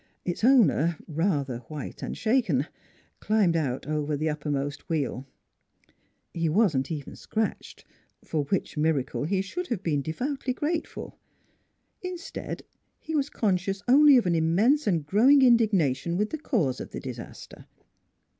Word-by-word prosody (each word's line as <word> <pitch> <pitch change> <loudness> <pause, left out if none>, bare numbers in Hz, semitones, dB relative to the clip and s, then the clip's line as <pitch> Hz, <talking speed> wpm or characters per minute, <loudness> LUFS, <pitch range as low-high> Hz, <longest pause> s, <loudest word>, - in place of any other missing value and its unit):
Its 175 +3 -3
owner, 210 - +4
rather 145 -6 -1
white 150 -3 -7
and - - -5
shaken, 215 - +1 0.5
climbed 210 -6 +2
out 135 -6 -1
over 150 -1 -1
the 155 +2 -1
uppermost 145 -2 -3
wheel. 140 -4 -2 1.1
He 165 -1 0
wasn't 155 -8 +2
even 145 -4 -5
scratched, 220 -1 -4 0.4
for 150 -3 -1
which 190 +6 -2
miracle 150 -3 0
he 190 +6 0
96 190 +1 -1
NEIGHBORS - - -13
should 360 -4 -4
have 205 -5 -2
been 150 -4 0
devoutly 255 - -3
grateful. 315 +5 -4 0.8
Instead, 365 -2 -6 0.4
he 320 - -7
was 285 -2 0
conscious 195 -1 -1
only 285 +2 +7
of 240 - +2
an 175 - +2
immense 200 - +2
and 165 -7 +1
growing 255 - +5
indignation 185 - +3
with 210 +2 0
the 315 - -4
cause 165 - 0
of - - -7
the - - -6
disaster. - - -9
175 Hz, 145 wpm, -27 LUFS, 150-235 Hz, 1.1 s, only